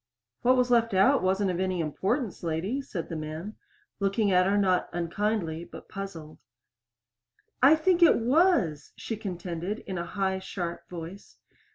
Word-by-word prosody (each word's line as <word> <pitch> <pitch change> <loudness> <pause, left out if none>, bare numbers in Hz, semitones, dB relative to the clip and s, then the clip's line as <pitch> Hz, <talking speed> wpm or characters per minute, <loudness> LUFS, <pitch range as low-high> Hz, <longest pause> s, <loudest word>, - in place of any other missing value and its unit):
"What 255 +1 +4
was 250 0 +2
left 230 -4 +3
out 265 +9 +5
wasn't 190 +1 +1
of 175 - -3
any 185 -1 -1
importance, 190 - -2
lady," 175 - -2
said 185 -10 -6
the 165 - -5
man, 155 +6 -6 0.4
looking 200 +1 +1
at 185 0 +4
her, 200 +1 +2
not 185 -3 +2
unkindly, 175 -1 -2
but - - -12
puzzled. 175 -6 -8 1.2
"I 275 +5 +8
think 345 +3 +2
it 340 - +7
was!" 240 - +2
she 225 - -5
contended 185 -1 -5
in 190 -3 -4
a 170 - -3
high, 190 -1 -1
sharp 175 -2 -6
voice. 175 +3 -9
190 Hz, 155 wpm, -28 LUFS, 170-225 Hz, 1.2 s, I